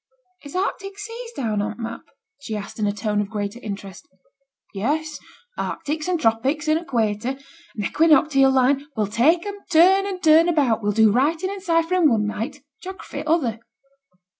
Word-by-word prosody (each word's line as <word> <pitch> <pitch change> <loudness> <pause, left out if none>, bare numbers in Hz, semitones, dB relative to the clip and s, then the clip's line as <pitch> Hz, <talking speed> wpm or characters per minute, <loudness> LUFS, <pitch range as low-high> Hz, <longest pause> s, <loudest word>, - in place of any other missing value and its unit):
'Is 285 - -10
t' - - -2
Arctic 390 +1 -3
seas 460 +3 -7
down 220 - -1
on 215 +1 -4
t' 240 - -7
map?' 230 +1 -5 0.4
she 230 -6 -5
asked, 205 +2 -8
in 210 - +1
a - - +1
tone 210 0 -1
of 200 - -5
greater 205 +2 -4
interest. 200 -3 -8 0.7
'Yes! 300 +10 -2 0.4
Arctics, 305 +2 -3
and 360 -2 0
tropics, 265 +7 0
and 310 +1 +3
equator, 240 -5 -1 0.4
and 210 -3 -3
equinoctial 300 -3 +4
line; 265 +2 +2
we'll 215 -2 +1
take 280 - +2
'em 405 0 -6
turn 370 +4 +5
and 380 -2 -5
turn 320 +2 +6
about; 275 -10 +2
we'll 205 0 0
do 220 0 +4
writing 315 - +1
and 400 -1 -7
ciphering 335 -1 +2
one 220 -4 +1
night, 225 +6 -4
and 290 - -21 0.2
geography 380 +1 -7
t' - - -9
other.' 265 -9 +1
280 Hz, 180 wpm, -22 LUFS, 220-335 Hz, 0.7 s, turn